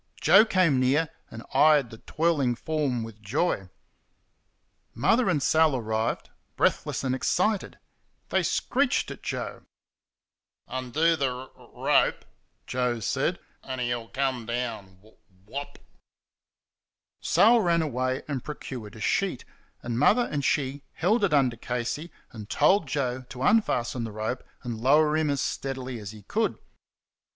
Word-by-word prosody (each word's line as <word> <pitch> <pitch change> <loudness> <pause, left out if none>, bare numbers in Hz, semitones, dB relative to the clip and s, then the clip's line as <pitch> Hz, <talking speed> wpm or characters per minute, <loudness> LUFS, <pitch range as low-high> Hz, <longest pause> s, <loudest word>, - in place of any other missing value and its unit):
Joe 215 +3 +7
came 185 - +3
near 140 +5 +2 0.2
and 110 +1 -9
eyed 145 -2 +5
the 115 - -11
twirling 150 -6 0
form 140 -4 -1
with 110 -1 -10
joy. 110 - -1 1.3
Mother 235 -2 +3
and 150 -7 +1
Sal 155 -1 +4
arrived, 110 -2 -2 0.2
breathless - - 0
and 130 -1 0
excited. 185 +10 0 0.5
They - - +2
screeched - - 0
at - - -9
Joe. - - -4 1.1
"Undo 130 +6 +1
th' 160 - -10
r 130 -1 -2
r - - -18 0.2
rope," - - +3 0.4
Joe 125 -2 -1
said, 110 - 0 0.2
"an' 130 -1 -6
he'll 120 -2 -2
come 130 -3 -2
w 120 -5 -3
w 110 - -21 0.3
WOP." 140 +7 -7 1.4
Sal 235 +3 +5
ran 170 -3 +2
away 130 -2 -2
and 140 -5 -3
procured 125 -7 -7
a 110 - -10
sheet, 195 - 0 0.4
and 120 0 -2
Mother 225 - +4
and 145 -2 -1
she 140 0 0
held 210 +6 +1
it 200 - +3
under 130 -5 +3
Casey, 125 +8 -3 0.2
and 110 -4 -9
told 165 +2 +3
Joe 130 -2 -1
to 130 0 -6
unfasten 125 - +2
the 110 - -6
rope 110 +4 -3 0.2
and 115 -2 -5
lower 150 +4 +4
him 155 -1 +1
as 140 -1 0
steadily 130 -3 -4
as 105 -3 -7
he 105 0 -11
could. - - -1
130 Hz, 140 wpm, -27 LUFS, 120-155 Hz, 1.4 s, Joe